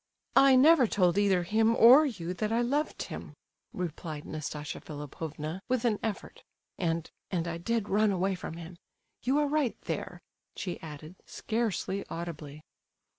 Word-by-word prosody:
"I 275 -1 +7
never 270 -1 +6
told 180 -4 +2
either 195 -3 +3
him 220 +5 +2
or 260 +8 +8
you 180 -8 -4
that 215 +3 -2
I 230 +1 +2
loved 285 +5 -1
him!" - - -8 0.4
replied 160 -3 -5
Nastasia 150 -1 -5
Philipovna, 155 +3 -6
with 250 -1 +1
an 215 -3 +2
effort. 220 -3 -5 0.4
"And—and 170 0 -3
I 170 0 -4
did 225 +3 -1
run 210 +1 +3
away 190 +1 0
from 170 -3 -6
him—you 175 - -5
are 295 0 +2
right 290 -4 0
there," - - -5 0.4
she 180 -3 -4
added, 155 +2 -9
scarcely 215 -3 -2
audibly. 155 -3 -7
190 Hz, 140 wpm, -29 LUFS, 165-230 Hz, 0.4 s, or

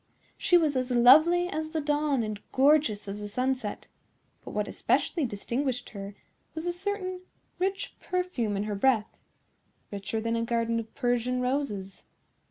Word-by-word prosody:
She 355 - +4
was 310 -4 +2
as 255 0 0
lovely 310 +9 +6
as 315 -2 -3
the 315 - -2
dawn 295 -3 +1
and 215 -1 -4
gorgeous 270 -7 +3
as 200 +1 -5
the 210 - -5
sunset; 250 0 -2 0.6
but - - -8
what - - -2
especially 320 -6 0
distinguished 245 +5 -3
her 200 -1 -7 0.4
was 320 +1 -4
a 350 - 0
certain 370 0 -3 0.4
rich 385 +2 -2
perfume 360 - -2
in 200 - -1
her 210 0 -3
breath—richer 210 -2 -3
than 230 +1 -1
a 230 - 0
garden 230 0 0
of 225 -1 -7
Persian 245 0 0
roses. 250 -7 -2
250 Hz, 150 wpm, -28 LUFS, 220-310 Hz, 0.6 s, lovely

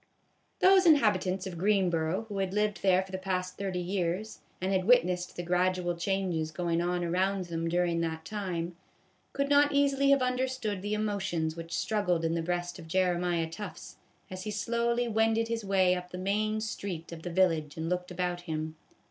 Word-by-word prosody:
" - - -43
Those 375 -1 +6
inhabitants 205 - +3
of 175 -3 -6
Greenboro, 185 -2 +1
who 205 -2 -4
had 190 0 -1
lived 210 -1 0
there 190 -1 +4
for 190 - -13
the 190 - -3
past 185 -1 -2
thirty 195 -2 -2
years, 185 +3 -2 0.2
and 185 +1 -1
had 185 -1 +1
witnessed 180 -7 +3
the 175 - -4
gradual 180 0 +1
changes 175 -3 -1
going 170 +1 -1
on 175 0 0
around 185 +2 0
them 165 -1 -3
during 175 -1 +1
that 160 -1 -3
time, 180 -5 -3 0.6
could 280 0 -1
not 285 0 +4
easily 280 -1 +3
have 275 -2 +5
understood 250 -5 -1
the 205 +2 -1
emotions 190 -7 -1
which 165 -1 -5
struggled 180 -6 0
in 165 - +1
the 165 - 0
breast 175 +1 -3
of 165 - -10
Jeremiah 175 -1 +1
Tufts 205 +6 -8 0.3
as 185 0 -6
he - - -3
slowly 235 +3 0
wended 225 0 +2
his 230 -1 -2
way 190 -2 +3
up 180 0 -4
the 180 - -7
main 215 +3 0
street 195 -6 -5
of 165 -1 -8
the 175 - -5
village 165 -4 +1
and 160 0 -3
looked 180 +1 -2
about 180 0 -2
him. 160 -2 -4
185 Hz, 185 wpm, -30 LUFS, 175-210 Hz, 0.6 s, Those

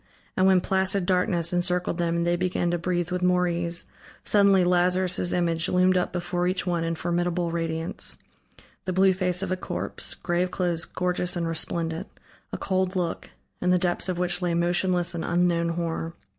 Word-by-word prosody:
And 185 - +3
when 190 -1 +5
placid 190 0 +1
darkness 180 -2 +1
encircled 180 0 0
them 170 -1 0
and 170 0 0
they 175 0 +2
began 175 -1 -1
to 175 - -1
breathe 175 0 -1
with 180 0 -1
more 180 0 +3
ease, 170 0 -2 0.4
suddenly 200 -2 +4
Lazarus' 180 0 +2
image 170 -2 0
loomed 185 +1 +3
up 180 -1 0
before 175 0 -1
each 185 +1 0
one 175 -2 0
in 165 0 -1
formidable 175 0 -1
radiance: 165 0 -2 0.7
the 185 - -2
blue 190 +1 +4
face 180 0 0
of 190 - -3
a - - +2
corpse, - - -2
grave 175 +1 -1
clothes 175 -3 -1
gorgeous 180 0 -1
and 170 -1 -1
resplendent, 165 +2 -2 0.4
a - - -4
cold 185 -1 -1
look, 175 -2 -2 0.3
in 180 - +1
the 180 - +5
depths 175 0 0
of 180 - -1
which 180 0 -1
lay 175 -1 0
motionless 175 0 +1
an 165 -1 -4
unknown 170 -1 +1
horror. 165 -1 -3
175 Hz, 180 wpm, -25 LUFS, 170-180 Hz, 0.7 s, when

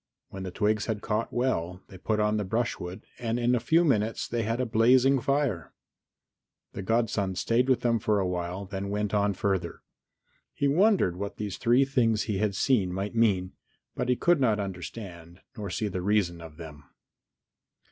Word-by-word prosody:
When 95 - -8
the 95 - -4
twigs 105 +3 0
had 110 -2 -3
caught 110 +1 -1
well, 90 -8 -1
they 95 - -11
put 110 +3 -1
on 105 0 +2
the 105 - -1
brushwood, 95 -3 -3 0.2
and 115 -1 -1
in 120 +1 +2
a 125 - +2
few 165 +8 +3
minutes 110 -6 0
they 120 0 -1
had 115 +2 -1
a 130 - +1
blazing 125 +4 +4
fire. 135 - -1 1.0
The 100 - -5
godson 100 -2 0
stayed 120 +7 +1
with 130 - +3
them 115 -1 +2
for 105 0 +1
a 95 - +1
while 90 +2 -3
then 95 +1 -5
went 105 0 -2
on 100 -1 +2
further. 95 -4 -2 0.7
He 140 - +1
wondered 170 - +3
what 100 +1 -5
these 105 -3 -5
three 125 +3 +4
things 115 -5 +1
he 105 -4 -2
had 105 -2 0
seen 100 -6 +2
might 95 +4 -3
mean, 100 -5 +2 0.4
but - - -2
could 175 -4 +3
not 110 -5 +2
understand, 90 -3 -7
nor 105 -2 -5
see 105 +4 -2
the 90 -2 -3
reason 90 -3 +1
of 80 -2 -11
them. 75 -3 -10
105 Hz, 180 wpm, -27 LUFS, 95-120 Hz, 1.0 s, blazing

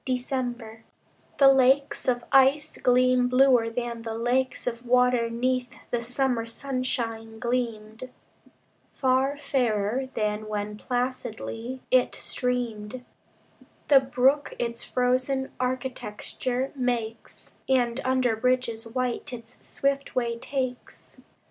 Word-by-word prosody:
December 245 -3 -3 0.5
The 270 -1 +7
lakes 270 +1 +3
of 245 -1 +1
ice 270 +2 +4
gleam 250 0 +4
bluer 250 -2 +4
than 235 0 -4
the 225 -1 -5
lakes 250 +3 0
Of 235 -1 -3
water 250 -1 +3
'neath 250 +1 0 0.2
the 240 - 0
summer 245 -1 0
sunshine 230 -3 -3
gleamed: 230 -1 -3 0.8
Far 265 +2 +1
fairer 245 -2 0
than 210 0 -1
when 210 0 -3
placidly 245 0 -4
it 255 -1 +3
streamed, 245 -2 -3 0.8
The 280 -2 +8
brook 265 +2 +1
its 235 -1 -3
frozen 255 +2 0
architecture 255 0 -3
makes, 235 -3 -4 0.2
And 250 -1 +2
under 255 -3 +2
bridges 235 -1 0
white 250 +1 -2
its 230 -1 -9
swift 275 0 -1
way 235 -2 -1
takes. 255 -1 -5
250 Hz, 105 wpm, -26 LUFS, 230-260 Hz, 0.8 s, The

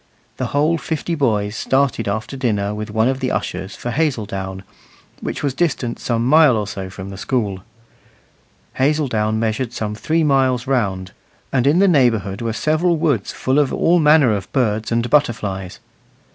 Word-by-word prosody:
The - - -2
whole 155 +4 +1
fifty 160 +2 -3
boys 110 -8 0
started 135 0 0
after 110 +6 -3
dinner 105 -6 -1
with 105 0 -5
one 110 +2 +1
of 130 0 0
the 130 -1 -1
ushers 95 -4 -3
for 120 - -5
Hazeldown, 100 -10 -2 0.6
which - - -5
was 140 -2 0
distant 135 -6 -1
some 115 -1 -1
mile 150 -2 +5
or 105 - -1
so 95 -2 -6
from 95 +1 -8
the 95 - -9
school. 105 -7 -1 1.2
Hazeldown 130 -7 +1
measured 115 +2 -1
some 105 -3 -3
three 160 +9 0
miles 130 -4 +2
round, 100 -9 -1 0.4
and 130 -1 +2
in 150 +4 +4
the 195 +2 +5
neighbourhood 115 - +2
were 115 -1 -1
several 155 +7 +1
woods 145 - 0
full 130 +3 0
of 145 -3 +2
all 175 +1 +3
manner 150 -6 +5
of 95 -3 -6
birds 110 -5 0
and 115 0 +1
butterflies. 105 -9 0
120 Hz, 165 wpm, -19 LUFS, 105-145 Hz, 1.2 s, mile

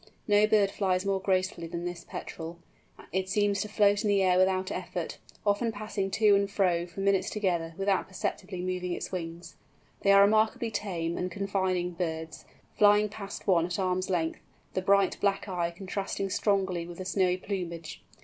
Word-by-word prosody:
No 205 0 +5
bird 205 -2 +3
flies 190 -2 0
more 195 -1 +1
gracefully 185 -3 0
than 170 +1 -5
this 175 -1 -5
Petrel; 165 +1 -7 0.5
it 190 +2 -1
seems 205 0 +2
to 210 - -4
float 205 -1 +3
in - - +1
the 200 -1 +3
air 180 -1 +4
without 185 0 +2
effort, - - -4 0.3
often 205 +3 +2
passing 210 -2 -3
to 210 +2 +4
and 200 0 +3
fro 180 -4 +1
for 175 +3 -7
minutes 195 -1 +2
together 175 -6 -1
without 195 -1 +1
perceptibly 185 0 -4
moving 180 -1 -2
its - - -5
wings. 170 -1 -6 0.4
They 200 - +4
are 200 0 +8
remarkably 220 +2 +2
tame 170 -6 -2
and 180 - -1
confiding 190 -2 -1
birds, 160 -2 -4 0.3
flying 210 0 +5
past 200 -1 -8
one 175 -3 +3
at 175 - -3
arm's 185 -1 0
length, 165 -3 0 0.3
the 185 - 0
bright 195 0 +3
black 200 0 +1
eye 175 -3 -1
contrasting 195 +2 -4
strongly 190 -5 0
with 175 -1 -9
the 185 - -6
snowy 185 -1 +2
plumage. 175 -4 -5
190 Hz, 175 wpm, -29 LUFS, 175-200 Hz, 0.5 s, are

